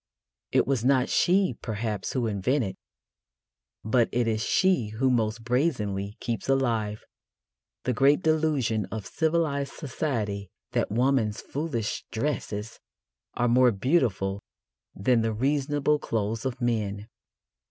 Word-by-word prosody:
It - - +3
was 135 -4 0
not 130 0 +3
she, 185 -3 +3
perhaps, 105 -3 -3
who 125 -3 0
invented, 110 +1 0 1.1
but 115 +2 +2
it 120 -1 +1
is 110 -1 0
she 185 - +2
who 120 +5 0
most 115 -1 0
brazenly 110 -6 -1
keeps 115 0 -3
alive, 115 -6 0 0.8
the 125 - 0
great 140 +8 +4
delusion 150 -9 +1
of 110 -3 -6
civilised 155 - 0
society 110 - -3 0.2
that - - 0
woman's 120 -2 +1
foolish 135 -8 -3
dresses 110 -4 -3 0.6
are 120 - +1
more 125 +1 +5
beautiful 100 - +1 0.5
than 115 +4 +2
the 110 0 0
reasonable 145 +4 +1
clothes 110 -1 -2
of 125 -1 -5
men. 105 -4 -1
120 Hz, 120 wpm, -27 LUFS, 110-140 Hz, 1.1 s, more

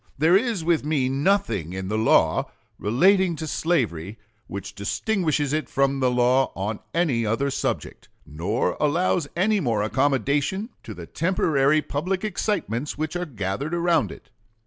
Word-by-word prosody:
There 160 +5 +4
is 220 -4 +1
with 165 -2 +2
me 145 -4 0
nothing 130 - 0
in 95 0 -4
the 105 - -2
law 110 +1 +3 0.3
relating 180 - +3
to 160 - -5
slavery 115 - -1 0.3
which 100 0 -6
distinguishes 150 - -1
it 155 0 -1
from 135 0 +1
the 130 -1 +3
law 125 +2 +2
on 105 +3 -3
any 155 -9 +1
other 115 +6 0
subject, - - -3 0.3
or 105 +8 0
allows 165 +1 +1
any 205 +4 +2
more 115 - 0
accommodation 140 - 0
to - - -9
the - - -8
temporary 155 -4 +1
public 180 +7 -2
excitements 165 - -2
which 155 +2 -3
are 175 0 -2
gathered 125 - -3
around 170 -2 +2
it.... - - -13
145 Hz, 145 wpm, -24 LUFS, 115-170 Hz, 0.3 s, There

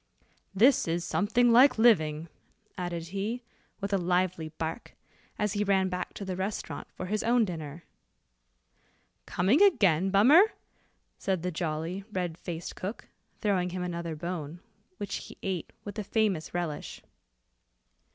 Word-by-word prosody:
"This 245 +4 +5
is 170 +1 -1
something 235 +6 +2
like 250 +2 +7
living," 160 -9 +3 0.5
added 170 -2 -4
he, 210 +6 -3 0.4
with 200 0 -3
a 195 - +3
lively 180 -2 0
bark, 160 +5 -5 0.4
as 210 -1 0
he 205 - 0
ran 190 -2 +2
back 180 0 -4
to 200 - -6
the 185 -1 -3
restaurant 190 +3 -4
for 185 - -5
his 210 +3 -1
own 235 0 +3
dinner. 160 -3 -6 1.4
"Coming 200 - +2
again, 195 - +4
Bummer?" 280 - +6 0.7
said 190 -3 -1
the 180 - -1
jolly, 165 +3 -3
red 180 -4 -2
faced 170 0 -6
cook, 200 +5 -6 0.3
throwing 190 -4 +1
him 180 0 -4
another 170 -2 -4
bone, 170 -1 -5 0.4
which 200 -1 -3
he - - -10
ate 185 -4 -3
with 205 +1 -6
a - - -2
famous 200 -6 0
relish. 175 -4 -4
185 Hz, 140 wpm, -29 LUFS, 170-210 Hz, 1.4 s, like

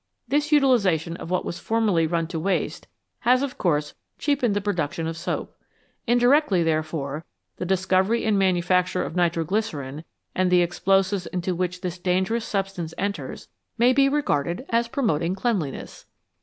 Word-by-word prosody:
This 295 +4 0
utilisation 200 - +3
of 165 - -8
what 180 0 0
was 170 - -4
formerly 210 -8 +1
run 165 0 0
to 165 - -3
waste 190 +4 -1 0.3
has, 250 +2 +3
of 280 - -5
course, 150 -4 0 0.2
cheapened 265 -8 +1
the - - +2
production 170 -6 -2
of 165 0 -3
soap. 165 - -4 0.5
Indirectly, 245 - +4
therefore, 155 -2 -2 0.3
the 180 - -4
discovery 190 +4 +2
and 215 -1 +2
manufac 180 -1 +2
ture 180 - -1
of 160 - -6
nitro 170 -2 +1
glycerine 155 -8 -3 0.3
and 185 0 +1
the 180 -1 +5
explosives 190 +2 +1
into 180 0 -2
which 180 0 -2
this 180 -1 -4
dangerous 190 +6 0
substance 195 -5 -3
enters 200 +1 -4 0.3
may 245 +2 +5
be 275 +1 +4
regarded 175 - 0
as 230 0 +2
promoting 180 - 0
cleanliness. 195 - -3
185 Hz, 155 wpm, -24 LUFS, 170-225 Hz, 0.5 s, the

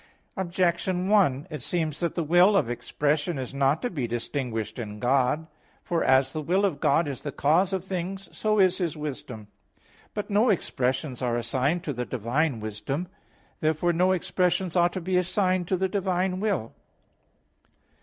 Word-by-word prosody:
Objection 180 0 0
1: 165 -10 +3
It 150 -3 -5
seems 155 +1 -2
that 170 -1 -1
the 170 - 0
will 175 +6 +5
of 120 - +1
expression 145 +6 -1
is 130 0 -5
not 140 +2 +1
to 245 - 0
be 135 -9 -2
distinguished 115 -2 -3
in 105 -2 -6
God. 130 +5 +2 0.4
For 170 -1 0
as 130 0 +3
the 155 - -2
will 185 +6 +2
of 165 -8 -1
God 145 +4 +3
is 140 -3 -5
the 145 - -4
cause 170 +8 +2
of 190 -2 -2
things, 190 +1 -4
so 215 0 +1
is 185 -2 +4
His 170 -4 -2
wisdom. 130 -7 -6 0.7
But 210 0 -4
no 215 +5 +4
expressions 130 - -1
are 120 -2 0
assigned 130 +8 0
to 150 - -3
the 125 0 -3
divine 125 +3 -1
wisdom. 110 - -4 0.5
Therefore 160 +2 +1
no 180 +3 +3
expressions 180 0 0
ought 175 0 +3
to 185 - -3
be 180 +2 0
assigned 185 -1 +1
to 185 - +1
the 190 +1 +1
divine 185 -1 -1
will. 195 - -1
165 Hz, 170 wpm, -26 LUFS, 130-185 Hz, 0.7 s, will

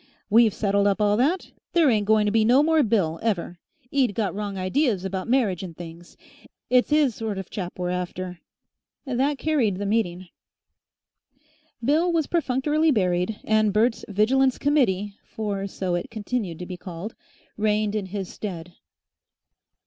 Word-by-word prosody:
We've 225 0 +6
settled 200 0 +1
up 200 +1 +1
all 205 -1 +3
that. 315 +10 0 0.2
There 335 -3 +4
ain't 210 -3 +1
going 215 -1 +4
to 205 - +1
be 220 0 +3
no 250 +6 +5
more 320 0 +4
Bill, 190 - +1
ever. 180 -5 -2 0.3
'E'd 255 -8 +1
got 215 -3 -1
wrong 200 -1 -4
ideas 195 +1 0
about 190 0 -3
marriage 225 -9 +2
and 175 -4 -8
things. 170 0 -11 0.5
It's 250 +3 +3
'is 300 -5 +3
sort 215 -2 -4
of 190 -2 -7
chap 185 -3 -5
we're 180 0 -2
after." 180 0 -4 0.7
That 270 +2 0
carried 260 -11 +1
the 205 - -3
meeting. 185 -4 -1 1.6
Bill 320 +6 +3
was 325 -3 +1
perfunctorily 305 0 +1
buried, 185 -4 +1
and 215 -1 +2
Bert's 225 +3 +1
Vigilance 255 +6 +2
Committee 210 -9 +1
(for 200 -2 -4
so 190 -2 -3
it 175 +9 -2
continued 215 -5 -3
to 180 - -6
be 180 0 -7
called) 180 +4 -7 0.4
reigned 210 0 +1
in 210 -3 -2
his 190 0 -4
stead. 175 -4 -7
210 Hz, 155 wpm, -24 LUFS, 185-250 Hz, 1.6 s, We've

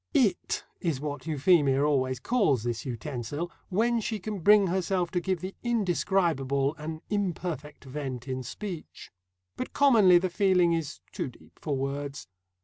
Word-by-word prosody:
"It" 245 -9 +2 0.2
is 165 -7 -1
what 145 0 -5
Euphemia 145 -3 +3
always 130 -4 +1
calls 155 - +2
this 120 0 -3
utensil, 130 +6 -4 0.2
when 230 +5 +2
she 220 +1 -2
can 210 +1 -4
bring 205 +3 +6
herself 180 -1 0
to 180 - +1
give 185 -1 -2
the 185 +1 -5
indescribable 170 - +1
an 155 +1 -6
imperfect 175 -7 -3
vent 130 -2 -5
in 130 0 -3
speech. 175 - -7 0.5
But - - -5
commonly 220 -11 +6
the 180 +1 0
feeling 180 -3 +3
is 165 -3 -3
too - - -3
deep 125 - -19
for 145 -3 -1
words. 140 -1 -4
165 Hz, 145 wpm, -28 LUFS, 140-190 Hz, 0.5 s, bring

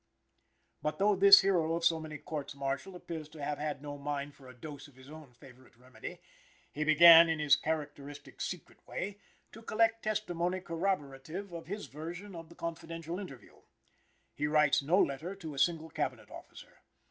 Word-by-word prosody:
But, 150 - -2
though 205 +1 +3
this 200 +1 +9
hero 170 -4 +1
of 170 0 -2
so 165 -1 +3
many 155 -1 -7
courts 145 -1 -6
martial 140 +7 -4
appears 160 -3 -7
to 155 -2 -10
have 145 0 -3
had 150 -2 -4
no 145 -1 -7
mind 145 0 -4
for 135 -2 -16
a 125 - -11
dose 145 +2 -9
of 140 - -21
his 130 +2 -15
own 155 -6 -12
favorite 125 0 -17
remedy, 125 +2 -10 0.5
he 150 - -2
began, 165 +2 +9
in 160 - 0
his 150 -2 +5
characteristic 145 -2 -5
secret 180 -3 -6
way, 200 +1 -5 0.3
to 225 - -12
collect 225 0 +1
testimony 185 -4 -1
corroborative 170 0 -3
of 165 -1 -8
his 205 +3 -5
version 175 +7 -8
of 165 -2 -9
the 170 - -15
confidential 165 +1 -6
interview. 140 -11 -11 0.8
He 150 - -1
writes 150 -2 +3
no 160 +7 +2
letter 160 +7 -1
to 165 -6 -8
a 140 - -6
single 160 0 +1
Cabinet - - -4
officer. - - -13
160 Hz, 175 wpm, -32 LUFS, 145-175 Hz, 0.8 s, this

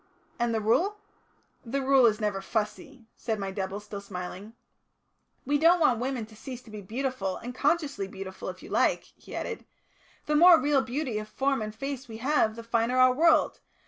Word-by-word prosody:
"And 240 0 +1
the 225 -1 0
Rule?" 350 - +2 0.7
"The 255 +4 -2
Rule 265 -2 +6
is 215 -2 +1
never 205 -3 -1
fussy," 230 - -4
said 225 -3 -3
my 195 -1 -4
double, 190 0 -4
still 205 -1 -8
smiling. 195 +2 -7 0.9
"We 290 +2 +1
don't 340 +3 +5
want 255 -8 +3
women 250 -2 -2
to 220 0 -17
cease 250 +3 -8
to 220 - -15
be 210 -1 -7
beautiful, 225 -2 -3
and 245 +1 -7
consciously 285 - 0
beautiful, 190 -1 -7
if - - -9
you - - -10
like," - - +2
he - - -11
added. - - -4 0.6
"The 300 - -1
more 340 +2 +8
real 285 0 +2
beauty 255 -3 -3
of 215 - -7
form 270 +3 0
and 215 0 -5
face 275 +1 -5
we 220 -1 -8
have, 230 -3 +1
the 230 - -8
finer 230 +2 0
our 255 0 +6
world. 325 +4 +3
235 Hz, 190 wpm, -28 LUFS, 210-275 Hz, 0.9 s, more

